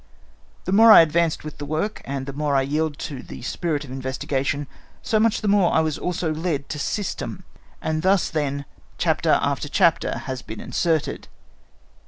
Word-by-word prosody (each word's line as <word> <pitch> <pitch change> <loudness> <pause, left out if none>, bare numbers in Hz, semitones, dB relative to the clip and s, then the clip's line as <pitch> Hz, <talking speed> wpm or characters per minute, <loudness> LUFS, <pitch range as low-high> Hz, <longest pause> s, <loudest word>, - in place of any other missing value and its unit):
"The - - -2
more 225 +3 +8
I - - +11
advanced 165 0 +1
with 155 -1 -8
the 145 - -4
work, 160 +8 -2
and 135 -1 -4
the 140 - -6
more 145 0 -1
I 135 - +3
yielded 150 +2 -1
to 135 -4 -5
the - - -10
spirit 150 +2 -2
of 135 - -10
investigation, 135 +2 -2 0.4
so 215 - +1
much 225 +1 +2
the 215 - -2
more 200 -3 +4
I 160 - +3
was 155 -2 -2
also 175 -3 -1
led 155 -3 -2
to 150 - -4
system; 195 +7 -3 0.4
and 155 0 -1
thus, 190 +1 +2
then, 140 -2 -2 0.3
chapter - - +2
after - - -1
chapter - - +2
has 130 -2 -4
been 110 - -8
inserted. 160 -4 -1
155 Hz, 180 wpm, -23 LUFS, 140-175 Hz, 0.4 s, I